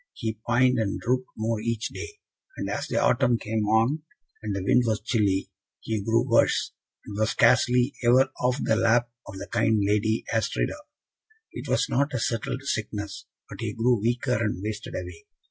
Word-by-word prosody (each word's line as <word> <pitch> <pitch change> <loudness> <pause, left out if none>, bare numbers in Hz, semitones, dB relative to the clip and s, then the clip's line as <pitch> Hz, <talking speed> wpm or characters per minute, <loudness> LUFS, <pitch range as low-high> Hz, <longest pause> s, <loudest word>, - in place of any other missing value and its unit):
He 110 -1 -4
pined 125 +1 +3
and 105 -3 -1
drooped 125 +1 0
more 110 0 -1
each 115 0 -2
day; 415 - -7 0.4
and - - -3
as - - -3
the - - 0
autumn 120 -1 +3
came 110 -1 -2
on, 115 +8 +2 0.4
and 105 -3 -3
the 95 - -3
wind 125 +6 +4
was 110 -1 +1
chilly, 100 -4 0 0.3
he 110 -2 -3
grew 115 +4 +2
worse, 115 - +3 0.3
and 105 - -8
was 110 +1 +2
scarcely 125 +2 +3
ever 130 +3 +4
off 125 +1 +2
the 110 - +2
lap 120 +2 +2 0.2
of 95 - -8
the 100 - -6
kind 110 -1 +2
Lady 105 +2 +1
Astrida. 115 - -1 0.7
It - - -7
was - - +2
not 140 +1 0
a - - 0
settled 115 +3 -2
sickness, 105 -5 -4 0.2
but - - -10
he - - -3
grew 120 -1 +2
weaker, 120 +1 0
and 105 -3 -2
wasted 105 0 -5
away. 90 -2 -7
115 Hz, 180 wpm, -26 LUFS, 105-125 Hz, 0.7 s, wind